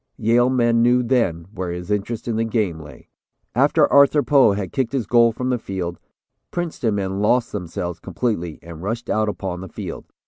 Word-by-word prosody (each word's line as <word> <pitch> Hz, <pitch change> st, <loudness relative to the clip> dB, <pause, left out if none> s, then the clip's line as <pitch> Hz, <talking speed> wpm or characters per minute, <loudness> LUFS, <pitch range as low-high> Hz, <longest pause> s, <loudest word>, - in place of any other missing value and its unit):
Yale 120 Hz, +3 st, +3 dB
men 120 Hz, -2 st, +2 dB
knew 125 Hz, +1 st, +4 dB
then 115 Hz, -10 st, 0 dB
where 95 Hz, -2 st, -4 dB
his 90 Hz, +3 st, -5 dB
interest 105 Hz, +3 st, -2 dB
in 115 Hz, -, -1 dB
the 115 Hz, -, +1 dB
game 105 Hz, -7 st, -1 dB
lay." 75 Hz, -4 st, -13 dB, 0.5 s
After -, -, +4 dB
Arthur 140 Hz, +1 st, +6 dB
Poe 135 Hz, -7 st, +5 dB
had 100 Hz, -3 st, -4 dB
kicked 130 Hz, -1 st, -1 dB
his 130 Hz, -5 st, -1 dB
goal 115 Hz, +2 st, +4 dB
from 125 Hz, +3 st, -3 dB
the 125 Hz, -, 0 dB
field, 90 Hz, -5 st, -5 dB, 0.5 s
Princeton 160 Hz, -11 st, -2 dB
men 95 Hz, 0 st, -2 dB
lost 120 Hz, +3 st, +2 dB
themselves 85 Hz, -2 st, -4 dB
completely 90 Hz, -10 st, -3 dB
and 85 Hz, -1 st, -10 dB
rushed 115 Hz, +5 st, -3 dB
out 110 Hz, 0 st, +1 dB
upon 95 Hz, -3 st, -4 dB
the 95 Hz, -, -8 dB
field. -, -, -7 dB
110 Hz, 185 wpm, -21 LUFS, 90-120 Hz, 0.5 s, Arthur